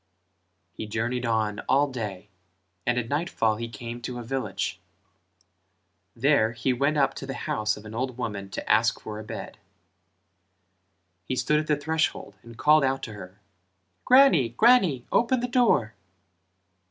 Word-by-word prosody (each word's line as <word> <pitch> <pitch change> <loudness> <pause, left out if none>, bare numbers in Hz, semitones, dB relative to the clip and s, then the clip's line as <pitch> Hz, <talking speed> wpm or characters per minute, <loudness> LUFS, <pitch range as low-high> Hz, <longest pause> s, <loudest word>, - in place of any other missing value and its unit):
He 110 - -7
journeyed 120 +3 -2
on 110 -2 0
all 140 +2 +4
day 105 -6 -6 0.6
and 125 0 +2
at 120 -2 -1
nightfall 140 -7 0
he 115 +1 -5
came 115 +1 -7
to 120 0 -5
a 120 - -6
village; 125 -3 -3 1.4
there 115 -3 +2
he 120 +3 0
went 140 +5 +1
up 135 -2 +2
to 135 - -8
the 135 - -4
house 105 0 -1
of 105 - -12
an 110 - -9
old 130 +1 -3
woman 105 -5 -4
to - - -6
ask - - +3
for 105 0 -7
a - - -7
bed. 110 - -8 1.6
He 130 - -3
stood 150 +4 +2
at 155 - -4
the 150 - +2
threshhold 155 -7 -1
and 115 -1 -14
called 150 +2 +4
out 135 0 0
to 110 - -6
her 95 0 -11 0.6
"Grannie, 250 - +5
grannie, 180 - +3
open 245 +2 +2
the 245 - -2
door." 235 - +2
120 Hz, 155 wpm, -26 LUFS, 110-145 Hz, 1.6 s, Grannie